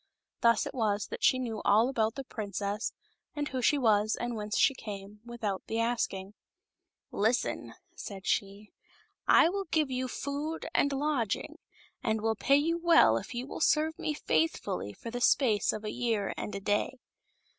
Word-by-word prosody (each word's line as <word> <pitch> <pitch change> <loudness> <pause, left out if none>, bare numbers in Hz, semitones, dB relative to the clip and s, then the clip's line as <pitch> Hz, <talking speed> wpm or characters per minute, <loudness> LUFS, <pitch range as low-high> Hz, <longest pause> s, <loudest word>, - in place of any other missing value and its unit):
Thus 230 -2 +4
it - - -6
was 210 -4 0
that - - -7
she 260 - +5
knew 230 -4 -3
all 215 +4 +4
about 225 -4 0
the 275 - -5
princess, 205 -2 -3 0.4
and 295 0 -2
who 260 -1 -3
she 290 - +3
was 215 -4 +3
and 240 0 -3
whence 210 0 -3
she - - +5
came, 205 -3 -8
without 230 -5 -3
the 225 - -2
asking. 220 -4 -1 0.4
" - - -57
Listen," 225 +4 0 0.2
said 195 -2 -8
she 200 +1 -2 0.6
I - - +7
will 390 +3 -2
give 310 -5 0
you 255 0 -1
food 290 +5 -4
and 285 - +3
lodging, 275 -6 -1 0.4
and 220 -1 0
will 220 +1 +1
pay 275 +5 +3
you 330 +4 +1
well 335 - +6
if 115 - -6
you 245 +1 -3
will 280 - -7
serve 315 +1 +2
me 300 - -2
faith 325 +2 +1
fully 185 - -4
for 230 - -9
the 245 +1 -4
space 235 -5 +3
of 215 - -6
a 210 - -2
year 230 -5 -1
and - - -5
a - - -3
day." 205 +6 0
230 Hz, 180 wpm, -30 LUFS, 210-275 Hz, 0.6 s, I